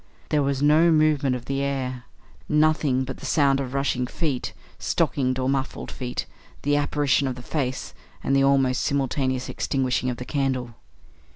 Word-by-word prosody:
There 150 - +2
was 140 0 0
no 155 +3 +5
movement 155 -4 +3
of 125 -1 -7
the 135 0 -1
air; 130 -3 -2 0.4
nothing 150 -4 +3
but 130 0 -6
the - - -9
sound 140 -3 +3
of 135 -1 -4
rushing 135 -2 0
feet 140 -3 -2 0.3
stockinged 130 -2 0
or 130 0 -1
muffled 135 0 -2
feet; 125 -1 -4 0.4
the 145 +1 +2
apparition 145 -1 +2
of 130 - -2
the 125 - -10
face; 130 -2 -3 0.3
and 135 - +1
the 135 - +4
almost 135 -2 +3
simultaneous 135 -2 0
extinguishing 130 -1 0
of 120 - -3
the 125 - -6
candle. 130 -3 -1
135 Hz, 165 wpm, -24 LUFS, 130-145 Hz, 0.4 s, no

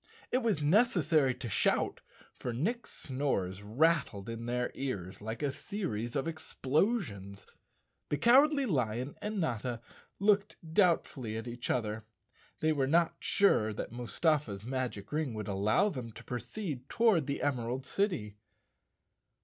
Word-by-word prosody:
It 255 - +3
was 220 - 0
neces 190 +4 +4
sary 140 -4 +3
to 125 - -6
shout, 110 - +1 0.3
for 125 - -4
Nick's 220 - -1
snores 115 -9 -2
rattled 115 -2 +1
in 115 +1 -5
their 125 0 -1
ears 100 -10 -4
like 110 +6 -5
a 140 - +1
series 120 - -4
of 140 +3 0
explosions. 150 - -1 0.6
The 145 - +1
Cowardly 275 - +5
Lion 125 - -1
and 210 0 -2
Notta 120 - -1 0.4
looked 205 +1 +3
doubtfully 160 - +1
at 115 +2 -5
each 120 0 -5
other. 110 -3 -1 0.6
They 155 0 +3
were 135 -3 +1
not 165 +3 +3
sure 110 - +3
that 105 - -5
Mustafa's 120 - 0
magic 125 -5 -3
ring 150 -6 -1
would 105 -2 -4
allow 105 - +2
them 125 - -6
to - - -11
proceed 125 - -5
toward 215 - +3
the 140 - -2
Emerald 130 -1 -1
City. 125 - -1
135 Hz, 140 wpm, -32 LUFS, 115-170 Hz, 0.6 s, Cowardly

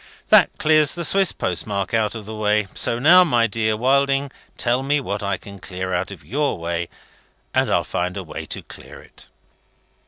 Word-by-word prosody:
That - - +5
clears 155 -2 +3
the 170 -1 -2
Swiss 195 0 +3
postmark 100 +4 -3
out 110 -1 +1
of 110 -2 -7
the 110 - -7
way. 105 -1 +1
So 115 - 0
now, 170 +9 +7
my 120 -9 +2
dear 110 0 -1
Wilding, 140 +2 +1 0.3
tell 120 +1 0
me 145 +2 +1
what 100 -6 -4
I 100 -2 -1
can 100 +1 -12
clear 95 0 -5
out 90 +1 -1
of 95 -5 -11
your 145 +4 -1
way, 85 0 -3 0.6
and - - +1
I'll - - +2
find 90 +2 -3
a 95 - -4
way 80 - -8
to - - -5
clear - - -12
it." - - -16
110 Hz, 190 wpm, -21 LUFS, 95-140 Hz, 0.6 s, now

